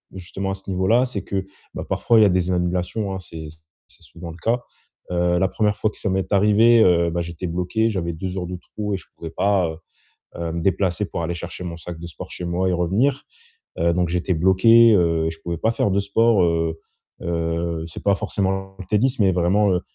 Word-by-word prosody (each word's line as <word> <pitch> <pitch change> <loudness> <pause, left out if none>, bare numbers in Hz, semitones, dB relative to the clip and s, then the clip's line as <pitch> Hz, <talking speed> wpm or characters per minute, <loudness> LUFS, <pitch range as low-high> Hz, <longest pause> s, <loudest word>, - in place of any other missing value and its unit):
justement 95 +1 -5
à 95 - -2
ce 95 - -18
niveau-là, 95 +7 +2
c'est 105 -6 -5
que, 95 -1 -3 0.3
bah, - - -4
parfois 115 - +2
il 110 - +7
y - - +7
a - - +4
des 90 0 +1
annulations, 90 +3 -1
hein, 95 - -4
c'est 80 -3 -9
c 80 - -19 0.3
c'est - - -20
souvent 85 0 -10
le 85 - -12
cas. 115 +8 0 0.5
Heu, 90 - -1 0.2
la 95 - +3
1re - - -19
première 105 +1 +1
fois 110 - +1
que - - -18
ça 100 - -2
m'est 95 +1 -1
arrivé, 105 +3 +5
heu, 85 -2 +3
bah, 85 +1 -1
j'étais 85 +1 -5
bloqué, 90 +7 0
j'avais 85 -4 -2
2 90 +3 -5
heures 90 - -2
de 90 - -5
trou 105 +3 -5
et - - 0
je 90 - -15
pouvais 80 -1 -8
pas, 100 -3 +1
heu, 80 - -7 0.6
heu, 85 -1 -3
me 85 - -3
déplacer 95 +1 0
pour 85 - -4
aller 85 +1 -2
chercher 90 +2 -7
mon 85 -2 -5
sac 80 +1 -8
de 85 - -8
sport 80 - -9
chez 90 - -6
moi 90 +2 0
et - - +1
revenir. 100 +11 +1 0.6
Heu, 85 0 +2
donc 90 -1 +1
j'étais 90 +1 0
bloqué, 110 +7 +6
heu, 85 -3 +2
je 80 - -10
pouvais 85 -1 -3
pas 110 - +1
faire 105 - 0
de 100 - +2
sport, 105 +1 +3
heu, 80 -1 0 0.4
heu, 85 -1 -2
c'est 80 - -9
pas 100 - +4
forcément 95 -1 -2
le 95 - -8
tennis, 120 +7 +1
mais 95 -2 +4
vraiment, 95 +4 +2
heu, 90 - +1
90 Hz, 235 wpm, -22 LUFS, 85-100 Hz, 0.6 s, il